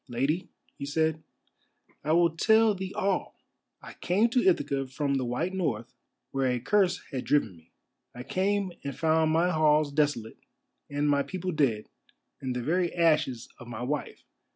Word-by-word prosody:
"Lady," 135 +8 -1 0.3
he - - -5
said, 160 +1 0 0.8
"I 155 +2 +1
will 170 0 +4
tell 220 +4 +4
thee 190 -1 -5
all! 195 -1 -1 0.5
I - - -9
came 205 +7 +1
to 245 +1 +2
Ithaca 140 -7 +1
from 140 +2 -2
the 135 -2 0
white 155 +10 -2
north, 125 - -2 0.4
where 135 -1 +1
a 125 -1 0
curse 185 - +1
had 130 -3 -3
driven 125 -10 +1
me; 80 0 -22 0.4
I 125 - -7
came 195 +4 0
and 140 -2 -5
found 160 0 +2
my 170 +3 +2
halls 155 -2 +3
desolate, 145 -6 -1 0.5
and 145 +1 -1
my 145 -1 +3
people 185 +4 -4
dead, 135 -10 0 0.5
and 130 -2 -3
the 125 - -2
very 175 +5 +1
ashes 150 -8 +2
of 120 - -11
my 120 0 -6
wife. 145 +3 -4
150 Hz, 165 wpm, -28 LUFS, 130-180 Hz, 0.8 s, will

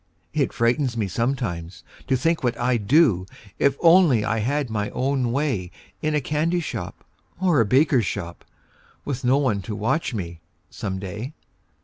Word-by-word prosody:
It - - +1
frightens 120 +1 +1
me 105 -3 0
sometimes, 95 -6 -3 0.2
to 135 - +2
think 165 +4 0
what 120 -2 0
I'd 120 -4 0
do, 120 - +4 0.3
If 140 0 +3
only 165 - +5
I 115 - 0
had 140 +5 0
my 105 -2 -2
own 130 -2 0
way 125 -10 -1 0.3
In 155 0 0
a - - +3
candy 155 +5 0
shop 115 - -6 0.4
or 175 -8 +3
a 110 - +1
baker 135 +1 +4
shop, 90 -5 -5 0.6
Witn 135 -2 -3
no 130 +3 +4
one 120 -8 +1
to 105 +3 -5
watch 115 +5 -1
me, 85 -5 -5 0.3
some 95 -5 -4
day. 105 - -6
120 Hz, 160 wpm, -23 LUFS, 105-145 Hz, 0.6 s, only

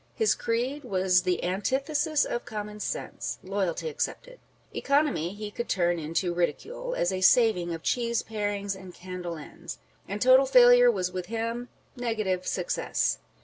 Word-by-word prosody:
His 445 -1 +3
creed 250 +6 -2
was 185 -1 +2
the 180 -1 -1
antithesis 275 - 0
of 240 - -3
common 210 -2 -6
sense, - - -4
loyalty 190 - -2
excepted. 480 +2 -4 0.3
Economy 280 - +1
he 210 0 -6
could 235 +3 -5
turn 175 -2 +1
into 165 +3 -1
ridicule, 475 - -2
" - - -5
as 175 - +1
a 185 - -3
saving 190 -5 +4
of 165 -1 -5
cheese 235 -1 0
parings 205 -2 -3
and 185 -2 -11
candle 180 -2 -6
ends;" 150 - -9
â€" - - -27 0.3
and 200 +2 -4
total 260 +3 +6
failure 245 -1 +7
was 185 -5 0
with 185 -1 -5
him 230 +2 -3
" - - -37
negative 215 -7 -2
success." - - -1
210 Hz, 160 wpm, -27 LUFS, 185-245 Hz, 0.3 s, failure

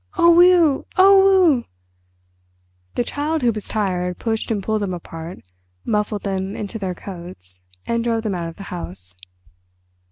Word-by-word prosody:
"Oh, 340 - +6
weh! 345 -4 +5 0.2
oh, 385 -4 +6
weh!" 240 - -6 1.3
The - - +1
Child 295 +3 -2
Who 240 - +4
Was 215 -2 -4
Tired 180 -4 -1
pushed 225 -1 -2
and 210 -4 -1
pulled 215 +1 -1
them 190 -3 -2
apart, 165 0 -9 0.4
muffled 210 -1 -1
them 195 0 -3
into 215 +2 -5
their 185 -3 -3
coats, 170 - -10 0.2
and 235 0 -1
drove 230 -1 0
them 215 -3 -2
out 170 -2 -3
of 165 - -12
the 200 - -9
house. 90 - -6
210 Hz, 155 wpm, -21 LUFS, 180-255 Hz, 1.3 s, Oh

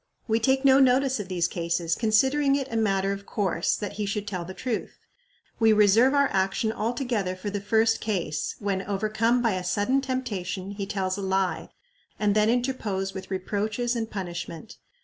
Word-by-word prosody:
We 225 0 +2
take 265 +4 +2
no 270 0 +7
notice 265 -1 +3
of 205 - -5
these 175 -2 0
cases, 170 -1 -1
considering 265 - +3
it 275 -2 -2
a - - -3
matter 195 -3 +1
of 200 0 -6
course 185 -4 0
that 205 - -5
he 205 - -1
should 210 0 -3
tell 185 -4 -3
the 185 +2 -9
truth. 235 +2 -4 0.6
We 225 -1 +5
reserve 215 +6 +5
our 280 -1 +4
action 195 +3 +1
altogether 225 -4 -2
for 200 +2 -5
the 205 0 -3
first 225 +2 +2
case 180 -8 -2
when, 200 -2 -2
overcome 215 +5 0
by 230 - +3
a 185 -1 -3
sudden 205 +9 +1
temptation, 205 -8 -3
he 200 -1 -5
tells 190 -2 -2
a - - -4
lie, 190 -3 -1 0.5
and 210 -1 +2
then 215 +1 +3
interpose 225 -6 -1
with 190 0 -8
reproaches 210 +5 -2
and 225 -1 -2
punishment. 175 +1 -6
210 Hz, 180 wpm, -26 LUFS, 190-235 Hz, 0.6 s, no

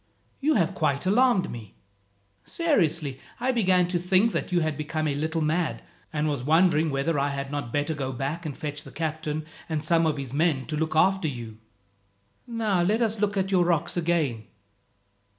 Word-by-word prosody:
You 300 +2 +2
have 175 -3 +2
quite 145 -4 0
alarmed 220 0 +3
me. 110 -4 -9 0.7
Seriously, 165 - 0 0.2
I 255 +2 +1
began 185 -7 +3
to 180 -1 0
think 190 +5 +3
that - - -3
you 175 -1 +2
had 155 -1 -1
become 155 +1 -2
a 145 - 0
little 160 +3 -1
mad, 160 +2 -1 0.3
and 155 -1 -1
was 145 -4 -1
wondering 160 +2 +3
whether 140 +2 0
I 140 +1 +1
had 140 0 -4
not 145 -5 -4
better 145 +3 0
go 135 -3 -3
back 140 +7 -3
and 150 -4 -5
fetch 150 -1 -4
the - - -12
captain 155 -1 -3 0.2
and 155 -2 -1
some 165 +1 +3
of 150 -2 0
his 135 -2 -5
men 150 -3 +1
to 155 - -4
look 155 +1 -1
after 190 +1 +3
you. 115 -5 -7 0.9
"Now 220 -6 0
let 215 +7 +2
us 220 -1 -1
look 205 0 0
at 190 0 0
your 185 -2 +4
rocks 170 -3 +1
again. 160 -10 0
160 Hz, 185 wpm, -26 LUFS, 145-185 Hz, 0.9 s, your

